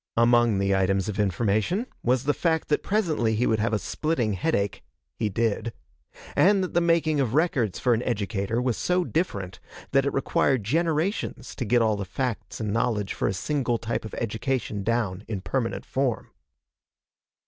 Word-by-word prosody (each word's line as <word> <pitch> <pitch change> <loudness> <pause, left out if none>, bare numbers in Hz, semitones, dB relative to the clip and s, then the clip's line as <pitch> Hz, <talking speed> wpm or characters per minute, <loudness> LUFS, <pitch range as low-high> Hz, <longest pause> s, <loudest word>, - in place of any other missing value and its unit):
Among 120 -2 +4
the 100 0 +2
items 95 +1 +1
of 105 - -4
information 105 - +1 0.2
was 125 +1 +1
the 145 +1 +2
fact 160 0 0
that 150 - +2
presently 160 - +1
he 120 +3 +1
would 110 -1 +2
have 110 +2 +1
a 110 - +2
splitting 120 - -1
headache 100 - -1 0.3
he 110 +4 -1
did 115 +2 -1 0.6
and 195 0 +4
that 185 - -4
the 175 - +3
making 165 -3 +2
of 130 -2 0
records 135 - +1
for 125 - +2
an 115 - +1
educator 110 -1 -1
was 125 -2 0
so 180 0 +1
different 100 - -2 0.3
that 135 0 +3
it - - +1
required 135 -3 +1
generations 165 - -1
to 125 - -4
get 120 +2 +3
all 110 -2 +2
the 100 - -3
facts 115 +5 -4
and 105 -2 -2
knowledge 115 -4 0
for - - -1
a - - +1
single 125 +3 0
type 115 +1 -3
of 110 - -7
education 110 -1 -2
down 105 -3 -1
in 105 -4 -3
permanent 115 +5 -2
form. 130 -3 -1
115 Hz, 175 wpm, -26 LUFS, 105-145 Hz, 0.6 s, Among